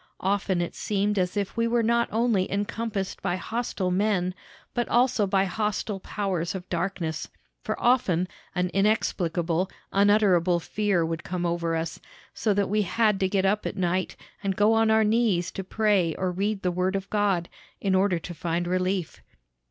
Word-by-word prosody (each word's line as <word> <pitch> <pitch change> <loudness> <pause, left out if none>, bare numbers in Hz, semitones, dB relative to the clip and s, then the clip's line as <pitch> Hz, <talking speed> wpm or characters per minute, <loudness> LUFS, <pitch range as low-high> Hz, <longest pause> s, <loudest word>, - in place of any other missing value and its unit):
Often 190 -2 +1
it 175 - -3
seemed 205 0 0
as 180 +2 -1
if 200 -1 -2
we 230 0 +1
were 235 0 +2
not 235 +1 +2
only 225 -4 +1
encompassed 205 0 -3
by 180 -2 0
hostile 210 -2 -2
men, 185 -2 +1 0.4
but 240 - -1
also 240 -4 +3
by 195 0 +2
hostile 210 +1 -2
powers 190 -3 -2
of 180 -1 -6
darkness; 170 -3 -2 0.3
for - - -3
often 195 -8 +2 0.3
an 180 0 +1
inexplicable, 185 -3 +1 0.2
unutterable 195 -4 +4
fear 195 -1 0
would 165 0 -3
come 180 -1 -3
over 170 -1 0
us, 165 0 -3 0.3
so 215 - 0
that 200 -1 +1
we 210 +2 +1
had 210 0 +2
to 190 - +1
get 195 0 +1
up 205 +2 +1
at - - -5
night, 185 0 0 0.3
and 195 -1 0
go 210 +3 +4
on 225 0 +3
our 220 0 +5
knees 210 -5 +2
to 195 - -5
pray 190 -5 +1
or 185 -1 -1
read 200 +2 -2
the 180 - +1
Word 185 +2 0
of 195 0 -3
God, 200 -5 +1 0.3
in 195 -2 0
order 190 -1 +3
to 170 +1 -7
find 170 +1 -2
relief. 185 -1 -1
195 Hz, 175 wpm, -26 LUFS, 180-210 Hz, 0.4 s, our